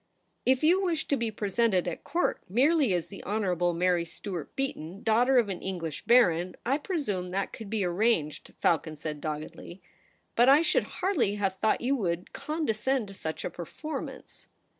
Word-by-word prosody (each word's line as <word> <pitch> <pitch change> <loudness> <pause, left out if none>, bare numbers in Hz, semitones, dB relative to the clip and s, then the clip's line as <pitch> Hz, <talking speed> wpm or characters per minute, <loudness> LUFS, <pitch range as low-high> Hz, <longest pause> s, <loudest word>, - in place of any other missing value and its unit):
' - - -46
If 260 +3 +1
you 355 +5 +5
wish 340 -5 -1
to 280 - +3
be 235 -4 -1
presented 205 -2 +1
at 170 - -4
Court 355 - 0
merely 275 - +3
as 175 -3 0
the 195 - -11
Honourable 180 -4 0
Mary 175 0 +2
Stuart 170 -1 -7
Beaton, 200 -9 -4
daughter 245 +4 +4
of 235 -4 +4
an 190 -3 -5
English 170 -5 -4
baron, 180 -7 +4
I 270 +5 +2
presume 240 - -2
that 195 +2 -2
could 220 -3 -8
be 215 -2 0
arranged/ 175 -4 0
Falcon 160 -1 +1
said 150 -1 -5
doggedly. 155 +3 -6 0.3
' - - -39
But 240 +3 +6
I 290 +4 +7
should - - +2 0.2
hardly 290 - +2
have 195 -2 -1
thought 220 - +2
you 265 +3 +1
would 175 -5 -2
condescend 270 -6 -1
to - - -9
such 160 -4 -5
a - - -3
performance.' 305 - -7
205 Hz, 180 wpm, -28 LUFS, 175-260 Hz, 0.3 s, I